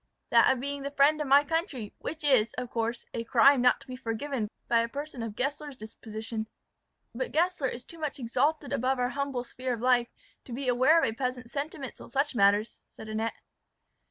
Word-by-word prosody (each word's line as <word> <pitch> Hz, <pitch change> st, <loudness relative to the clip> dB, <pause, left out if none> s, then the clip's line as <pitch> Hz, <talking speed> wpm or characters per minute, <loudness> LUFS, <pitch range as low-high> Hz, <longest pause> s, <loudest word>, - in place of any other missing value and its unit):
"That 230 Hz, -1 st, +6 dB
of 265 Hz, -, 0 dB
being 280 Hz, +2 st, -3 dB
the 280 Hz, -, -3 dB
friend 290 Hz, +2 st, +3 dB
of 295 Hz, -, -2 dB
my 280 Hz, +2 st, +6 dB
country, 295 Hz, -, -2 dB
which 320 Hz, 0 st, -6 dB
is, 255 Hz, -6 st, +4 dB
of 250 Hz, -1 st, -5 dB
course, 230 Hz, 0 st, -2 dB
a 230 Hz, -, -2 dB
crime 250 Hz, +3 st, +5 dB
not 250 Hz, 0 st, +4 dB
to -, -, -16 dB
be 255 Hz, -, -6 dB
forgiven 240 Hz, -1 st, -3 dB, 0.2 s
by 235 Hz, -, +4 dB
a 230 Hz, 0 st, 0 dB
person 285 Hz, 0 st, -6 dB
of 225 Hz, -2 st, -5 dB
Gessler's 285 Hz, +2 st, -3 dB
disposition." 220 Hz, 0 st, -6 dB, 0.7 s
"But 255 Hz, +2 st, -3 dB
Gessler 340 Hz, -2 st, +1 dB
is 245 Hz, -1 st, -5 dB
too 335 Hz, -, -10 dB
much 305 Hz, -2 st, -3 dB
exalted 275 Hz, +4 st, 0 dB
above 260 Hz, +2 st, +1 dB
our 250 Hz, 0 st, +1 dB
humble 275 Hz, -1 st, -2 dB
sphere 255 Hz, 0 st, -3 dB
of -, -, -10 dB
life, 245 Hz, -1 st, +3 dB, 0.4 s
to 245 Hz, -, -8 dB
be 265 Hz, +2 st, -4 dB
aware 255 Hz, +7 st, +5 dB
of -, -, +3 dB
a 220 Hz, -, -2 dB
peasant's 250 Hz, 0 st, -4 dB
sentiments 280 Hz, -2 st, -5 dB
on -, -, -11 dB
such 280 Hz, +1 st, 0 dB
matters," 205 Hz, 0 st, +2 dB
said 220 Hz, -, -11 dB
Annette. 220 Hz, +1 st, -2 dB
255 Hz, 205 wpm, -29 LUFS, 230-285 Hz, 0.7 s, That